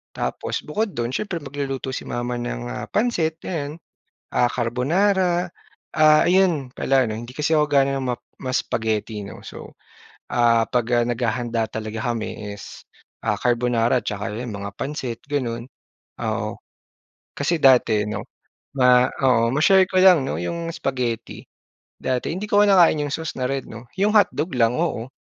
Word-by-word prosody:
Tapos - - -3
bukod 205 +6 -2
dun 120 0 -2
siyempre 200 +2 -2
magluluto 135 -2 -4
si - - -5
mama 120 0 -3
ng, - - -4
ah, - - -5
pansit 175 -9 0
ayan, 150 -4 -3 0.6
ah, 120 - +3
carbonara. 175 - +1 0.4
Ah, 155 -1 +5
ayun 175 -7 +2
pala 135 0 +2
'no, 110 -2 -3
hindi 120 +2 -9
kasi 150 +1 0
ako 150 -1 +3
gaano 135 -1 +2
ma 125 -2 -1 0.3
ma-spaghetti, 110 -5 -2
'no. - - -10
So, - - -10 0.6
ah, 115 -1 +3
'pag, 120 -2 0 0.2
ah, - - -3
naghahanda 120 -1 -1
talaga 110 +2 -3
kami 110 -2 -5
is, 100 - -11 0.4
ah, 105 - 0
carbonara 120 0 +2
at - - -27
tsaka 100 -1 -4
yan, 120 +3 -5
mga 100 0 -6
pansit 130 -4 -4
ganun, 120 -4 -2 0.5
oo. 110 -1 -3 0.7
Kasi 160 +4 0
dati 120 -6 +4
'no, 105 -1 -4 0.5
ma 125 -1 +5 0.2
oo, 115 -3 +4
ma-share 190 +6 +5
ko 185 - +2
lang, 180 -6 +7
'no, 75 - -2
yung 165 - -3
spaghetti. 125 -6 -3 0.6
Dati 130 -1 -1
hindi 185 +4 -5
ko 205 - +4
kinakain 180 -6 +5
yung 140 - -4
sauce 160 0 -4
na 125 - 0
red 135 -1 -2
'no, 115 +2 -10
yung 205 +2 +3
hotdog 180 -5 +3
lang, 115 0 +3
oo. 155 -8 -1
125 Hz, 155 wpm, -22 LUFS, 115-155 Hz, 0.7 s, lang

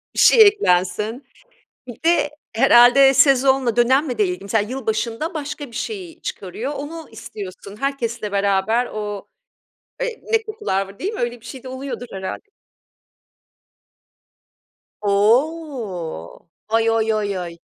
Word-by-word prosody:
Bir - - -2
şey 460 - +7
eklensin. 210 - +1 0.6
Bir 245 +3 -11
de 330 -3 +3 0.2
herhâlde 245 +3 +6
sezonla, 265 -2 +4
dönemle 255 +2 +2
de 210 - +3
ilgili. 180 +1 -4
Mesela 210 +1 0
yılbaşında 235 - -2
başka 295 -1 -5
bir 235 - -14
şeyi 360 - -6
çıkarıyor. 220 +9 -5
Onu 310 +3 -7
istiyorsun 205 -2 -9
herkesle 235 -6 -2
beraber 200 +4 +1
o, 210 -2 -5 0.7
eee, - - -3
ne 450 0 +3
kokular 425 - -2
var 195 +1 -14
değil 395 +4 -3
mi? 440 - -6
Öyle 240 0 -2
bir - - -15
şeyde 260 -1 -9
oluyordur 260 -1 -6
herhâlde. 190 - -7 2.5
O. 210 - -1 0.2
Oy 225 0 +2
oy 225 -1 +1
oy 205 -2 -1
oy. 170 -2 -7
240 Hz, 125 wpm, -21 LUFS, 205-280 Hz, 2.5 s, şey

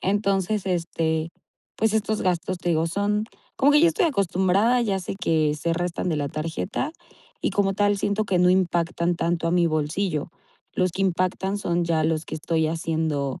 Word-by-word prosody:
Entonces 200 0 0
este, 165 -2 -1 0.5
pues, 220 -1 +1
estos 215 0 0
gastos 180 0 -1
te 175 - -3
digo 165 0 +2
son 205 +4 0 0.3
como 285 +2 +4
que 295 - +6
yo 340 - +6
estoy 330 - +2
acostumbrada. 200 - +2
Ya 200 -5 0
sé 185 - -5
que 155 -3 +2
se 165 +3 -1
restan 175 +1 -2
de 160 - 0
la 145 -1 -1
tarjeta 165 - -3 0.5
y - - 0
como 195 -1 +1
tal 205 0 +2
siento 205 +2 0
que 185 -3 0
no 180 0 +5
impactan 175 -1 +1
tanto 165 0 -1
a - - +1
mi 175 -1 +3
bolsillo. 155 +1 -1 0.4
Los 185 -2 0
que 195 - -2
impactan 190 +2 0
son 175 -3 0
ya 160 -2 +1
los 160 0 0
que - - -6
estoy 160 0 0
haciendo, 160 -4 -2
180 Hz, 185 wpm, -24 LUFS, 165-200 Hz, 0.5 s, que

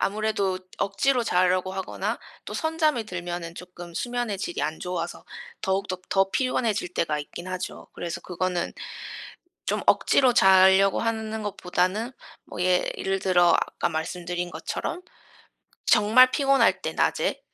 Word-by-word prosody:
아무래도 200 -2 0 0.2
억지로 245 +6 +1
자려고 185 -1 +2
하거나 190 -1 -3 0.3
또 - - -7
선잠이 315 -7 +1
들면은 175 -3 -5
쪼끔 175 -1 -10
수면의 240 -3 -2
질이 175 -4 -3
안 155 +2 -2
좋아서 180 -1 -4 0.4
더욱더 190 -1 -1
더 195 0 +2
피곤해질 230 -8 0
때가 155 -2 0
있긴 175 +4 -9
하죠. 185 0 -5
그래서 170 -2 -5
그거는 180 0 -2 0.9
쫌 - - 0
억지로 255 -3 +4
잘려고 190 -1 +6
하는 220 -1 -2
것보다는 195 +4 -1 0.3
뭐 - - -8
예 180 0 +3
예를 195 0 -1
들어 175 -2 +4
아까 - - +1
말씀드린 175 +2 -3
것처럼 165 - -4 0.8
정말 235 +5 +6
피곤할 275 -2 +3
때 - - -2
낮에 - - 0
190 Hz, 300 characters per minute, -25 LUFS, 180-220 Hz, 0.9 s, 잘려고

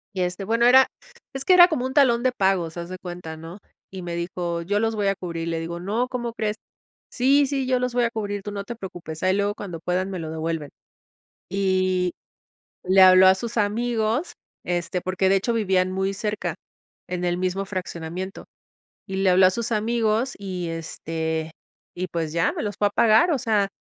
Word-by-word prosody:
Y, 185 - -1
este, 180 +2 -2
bueno, 230 +3 +2
era 260 +2 +7 0.5
es 270 0 -4
que 370 - +5
era 355 -1 +9
como 310 -8 -2
un 260 - -3
talón 250 -5 +4
de 255 - +3
pagos, 190 -7 0
haz 170 0 -6
de 185 - -6
cuenta, 175 -3 -8
¿no? 165 +5 -10 0.3
Y 190 -1 -7
me 175 -1 -5
dijo: 170 0 -3
"Yo 205 +4 0
los 225 0 0
voy 205 -2 0
a 195 - +2
cubrir". 170 -3 -5
Le 165 -1 -1
digo: 170 +1 -5
"No, 215 +7 -1
¿cómo 240 -2 -4
crees?", 215 -2 -2 0.6
"Sí, 275 +3 +4
sí, 270 -1 -2
yo 255 -1 +2
los 250 -1 -2
voy 245 0 +2
a - - +1
cubrir, 205 -3 -3
tú 205 - -6
no 200 -1 -4
te 235 +4 -7
preocupes. 175 -7 -8
Ahí 185 0 +3
luego, 200 0 0
cuando 180 -6 -7
puedan, 180 +3 -1
me 190 - -4
lo 160 -1 -5
devuelven". 160 -2 -3 0.8
Y 185 -2 +1 0.7
le 190 +1 +5
habló 185 0 +8
a 190 - +7
sus 235 +5 -6
amigos, 225 - 0 0.3
este, 175 0 -2
porque, 185 +1 0
de 195 - +5
hecho, 200 +5 0
vivían 185 -4 +1
muy 190 +1 -1
cerca, 210 +1 -3 0.5
en 180 -1 -3
el 175 0 0
mismo 185 +1 -1
fraccionamiento. 185 -1 -5 0.6
Y 190 - -4
le 195 -1 +3
habló 185 +1 +6
a - - +5
sus 235 +5 -3
amigos 225 +3 +1
y, 185 -3 -4
este, 160 -1 -4 0.4
y 185 +1 -3
pues 165 -3 -3
ya, 165 0 +1
me - - -4
los 205 -1 -3
fue 205 - +3
a - - -2
pagar. 235 +13 +4
O 290 - +2
sea, 215 -4 +1
190 Hz, 205 wpm, -24 LUFS, 175-225 Hz, 0.8 s, era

